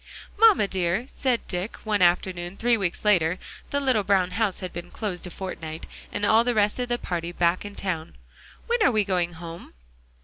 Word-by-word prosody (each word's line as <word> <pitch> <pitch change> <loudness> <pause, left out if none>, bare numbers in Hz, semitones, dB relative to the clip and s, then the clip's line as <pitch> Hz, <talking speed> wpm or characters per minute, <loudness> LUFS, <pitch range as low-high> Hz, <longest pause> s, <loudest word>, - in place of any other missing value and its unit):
"Mamma 425 - +6
dear," 190 +4 0
said 255 -4 -1
Dick, 180 +4 -3
one 210 -2 0
afternoon 175 +1 +1
three 240 0 +3
weeks 195 -2 -3
later 180 -4 +3 0.3
(the 285 - 0
little 260 -6 +2
brown 190 -2 +2
house 205 0 0
had 185 -2 -6
been 175 +1 -7
closed 190 -5 -4
a - - -6
fortnight, 165 -4 -6 0.3
and 205 0 -1
all 220 +2 +5
the 245 -1 0
rest 210 +2 +2
of 245 -1 -2
the 240 - +1
party 175 -5 -3
back 175 +1 +1
in 205 0 -8
town), 170 -6 -3 0.5
"when 475 0 0
are 410 - +5
we 215 -2 +2
going 180 -3 0
home?" 165 - -9
190 Hz, 195 wpm, -25 LUFS, 175-220 Hz, 0.5 s, Mamma